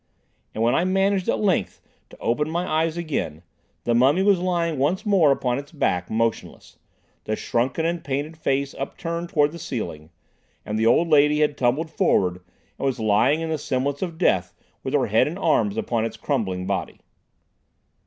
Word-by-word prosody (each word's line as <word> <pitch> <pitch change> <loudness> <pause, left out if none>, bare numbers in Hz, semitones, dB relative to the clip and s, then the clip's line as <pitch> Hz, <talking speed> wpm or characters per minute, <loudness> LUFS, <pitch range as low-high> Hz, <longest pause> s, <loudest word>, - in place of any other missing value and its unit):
And 110 - 0
when 120 - +3
I - - +2
managed 195 0 +1
at - - +2
length 200 -4 0 0.3
to - - -15
open 150 +6 -1
my 175 +2 -2
eyes 160 +1 0
again, 135 - -3 0.4
the 120 - +1
mummy 135 +10 +4
was 200 -2 +4
lying 170 -4 -1
once 160 +10 0
more 190 -8 +4
upon 130 -2 0
its 140 - -10
back, 90 - -1
motionless, 115 0 -3 0.5
the 110 - -1
shrunken 125 +9 -1
and 170 0 -1
painted 145 +4 -3
face 140 -3 -1
upturned 170 +4 -5
towards 150 -2 +2
the 170 - -8
ceiling, 80 - -5 0.6
and 105 +1 -2
the 110 - +3
old 160 +9 +4
lady 150 -1 +4
had 150 -1 +2
tumbled 140 +6 0
forward 90 - +2 0.4
and - - -2
was 130 -3 -1
lying 110 +8 +2
in 165 0 -3
the 155 - -1
semblance 140 +1 -2
of 170 -3 -4
death 95 - +1 0.3
with - - -2
her - - +3
head - - +3
and - - -4
arms 105 0 +1
upon 115 -2 -1
its 115 - -4
crumbling 95 -10 -2
body. 95 -1 -3
145 Hz, 180 wpm, -23 LUFS, 115-165 Hz, 0.6 s, mummy